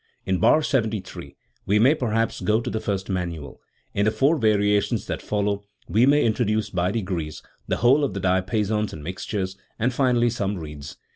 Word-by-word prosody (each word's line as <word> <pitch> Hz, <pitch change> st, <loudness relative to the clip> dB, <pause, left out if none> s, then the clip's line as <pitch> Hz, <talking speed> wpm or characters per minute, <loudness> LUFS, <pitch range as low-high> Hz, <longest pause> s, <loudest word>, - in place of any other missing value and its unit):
In 95 Hz, -1 st, 0 dB
bar 155 Hz, -, +4 dB
73 110 Hz, -8 st, -2 dB, 0.3 s
we 100 Hz, -, +3 dB
may 125 Hz, +7 st, +5 dB
perhaps 115 Hz, -6 st, -1 dB
go 110 Hz, +1 st, +2 dB
to 115 Hz, -, -4 dB
the 110 Hz, -, -1 dB
first, 100 Hz, -3 st, -3 dB
manual; 85 Hz, -6 st, -4 dB, 0.3 s
in 100 Hz, -, +1 dB
the -, -, +4 dB
four 135 Hz, +9 st, +3 dB
variations 105 Hz, 0 st, +2 dB
that -, -, -4 dB
follow 100 Hz, -1 st, -1 dB, 0.3 s
we 115 Hz, +5 st, +3 dB
may 145 Hz, +1 st, +4 dB
introduce 110 Hz, -2 st, 0 dB
by 90 Hz, -1 st, 0 dB
degrees 90 Hz, -7 st, -3 dB, 0.2 s
the -, -, 0 dB
whole 135 Hz, +5 st, +4 dB
of 120 Hz, -9 st, -1 dB
the -, -, -2 dB
diapasons 100 Hz, +3 st, 0 dB
and 75 Hz, -, -8 dB
mixtures, 95 Hz, +3 st, -4 dB, 0.2 s
and 125 Hz, +3 st, 0 dB
finally 120 Hz, -2 st, +2 dB
some 100 Hz, -3 st, -2 dB
reeds. 75 Hz, -3 st, -8 dB
105 Hz, 175 wpm, -24 LUFS, 95-115 Hz, 0.3 s, may